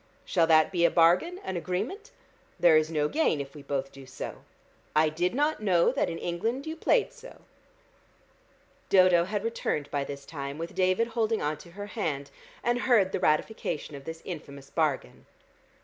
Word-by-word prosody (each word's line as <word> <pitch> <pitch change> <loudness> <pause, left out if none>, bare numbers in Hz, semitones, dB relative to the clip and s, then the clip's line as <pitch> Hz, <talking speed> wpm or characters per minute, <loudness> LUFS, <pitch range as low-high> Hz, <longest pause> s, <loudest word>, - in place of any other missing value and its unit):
Shall 165 -3 +2
that 160 +2 +5
be 175 -2 +1
a 170 - +6
bargain, 180 - +3
an 190 - -4
agreement? 190 - -3 0.5
There 170 -2 +6
is 155 0 +3
no 150 -2 +1
gain 295 - +1
if 140 -1 -6
we 150 - -10
both 140 -1 -3
do 135 -1 -13
so. 130 - -7 0.6
I 155 0 +4
did 175 +7 -1
not 295 -1 +1
know 185 -3 +3
that 270 - 0
in 165 - -4
England 225 +12 -2
you 315 0 -4
played 475 +7 +2
so." - - -13 1.5
Dodo 185 -3 +5
had 205 +2 -3
returned 225 -10 -2
by 145 -1 0
this 140 0 -7
time, 140 -2 -6
with 165 +1 -6
David 185 +5 +2
holding 225 -1 0
on 150 +1 -1
to 170 +3 -14
her 205 +2 -6
hand, 155 -10 -3 0.3
and 240 +1 +1
heard 220 -7 +3
the - - -1
ratification 155 -1 -1
of 140 -1 -9
this 160 0 -7
infamous 140 -5 -8
bargain. 145 - -1
170 Hz, 180 wpm, -28 LUFS, 150-215 Hz, 1.5 s, a